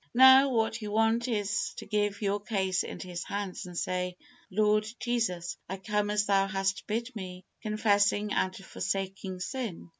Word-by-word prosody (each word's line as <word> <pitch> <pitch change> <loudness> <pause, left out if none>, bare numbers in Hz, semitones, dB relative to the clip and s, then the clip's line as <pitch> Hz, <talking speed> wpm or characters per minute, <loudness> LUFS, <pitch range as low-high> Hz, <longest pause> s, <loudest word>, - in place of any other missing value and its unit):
Now, 265 +2 +9
what 225 -2 0
you 210 - -4
want 225 +3 +2
is 205 -4 -1
to - - -7
give 205 0 -1
your 200 +1 +1
case 190 -3 0
into - - -6
His 175 -1 -4
hands, 200 -3 -4
and 175 -1 -8
say, 180 0 -2 0.3
"Lord 215 +1 +2
Jesus, 220 -8 -1
I 190 - -3
come 210 +1 -1
as 210 0 +2
Thou 195 -1 +3
hast 195 0 -1
bid 230 +4 -2
me, 185 -2 -7 0.2
confessing 210 -1 +2
and 185 0 +1
forsaking 195 -1 -4
sin. 225 -7 -4
205 Hz, 160 wpm, -29 LUFS, 190-220 Hz, 0.3 s, Now